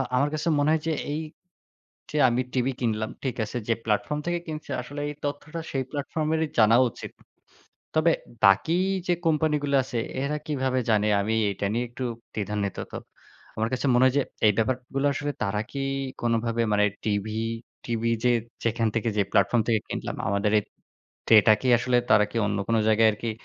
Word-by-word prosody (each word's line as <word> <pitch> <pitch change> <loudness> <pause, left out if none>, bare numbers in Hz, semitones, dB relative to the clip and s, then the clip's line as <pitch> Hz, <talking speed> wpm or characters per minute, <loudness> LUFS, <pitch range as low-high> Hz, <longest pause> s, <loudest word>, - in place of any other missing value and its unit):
আমার 140 +3 +2
কাছে 155 +2 -2
মনে 145 +1 +2
হয় 160 -1 +2
যে, 160 - +1 0.2
এই 150 +2 -2 0.9
যে, 150 - -4
আমি 120 +1 +1
টিভি 130 0 +1
কিনলাম, 110 -2 -1
ঠিক 130 -2 -2
আছে; 110 - -7
যে, 115 - +3
প্ল্যাটফর্ম 115 +7 0
থেকে 175 0 0
কিনছি, 155 -2 -7
আসলে 145 +4 -7
এই 150 - -5
তথ্যটা 150 +3 -4
সেই 135 - -1
প্ল্যাটফর্মেরই 155 +2 -1
জানা 110 +1 +6
উচিত। - - -9 0.8
তবে 160 +1 +4 0.3
বাকি 100 - +5 0.3
যে, 180 - +2
কোম্পানিগুলো 150 -2 +1
আছে, 125 -2 -4 0.2
এরা 145 +2 -1
কিভাবে 130 -4 0
জানে 105 -1 +3
আমি 110 +3 0 0.2
এটা 100 0 -3
নিয়ে 120 +2 0
একটু 120 +2 -6 0.3
দ্বিধান্বিত। 100 -2 -3 0.6
আমার 110 +1 0
কাছে 130 +2 -1
মনে 125 +1 +5
হয় 130 - +2
যে, - - +3 0.2
এই 105 - +6
ব্যাপারগুলো 130 +4 -1
আসলে 145 +1 -3
তারা 105 0 0
কি 140 - -4 0.4
কোনভাবে 115 0 0
মানে 105 0 +4 0.2
টিভি, 105 +1 -1 0.5
টিভি 115 -1 -1
যে, 125 - +5 0.3
যেখান 115 0 +1
থেকে 115 0 0
যে, 105 - +4
প্ল্যাটফর্ম 120 -2 +3
থেকে 110 -2 +3
কিনলাম, - - -4
আমাদের 100 +1 +1
এই - - -1 0.7
ডেটা 110 -1 +8
কি 130 - -1
আসলে, 125 +1 +1
তারা 105 -1 +6
কি - - -7
অন্য 105 0 -1
কোন 115 - +2
জায়গায় 110 +1 +5
আরকি 115 +2 -4
120 Hz, 175 wpm, -26 LUFS, 110-145 Hz, 0.9 s, ডেটা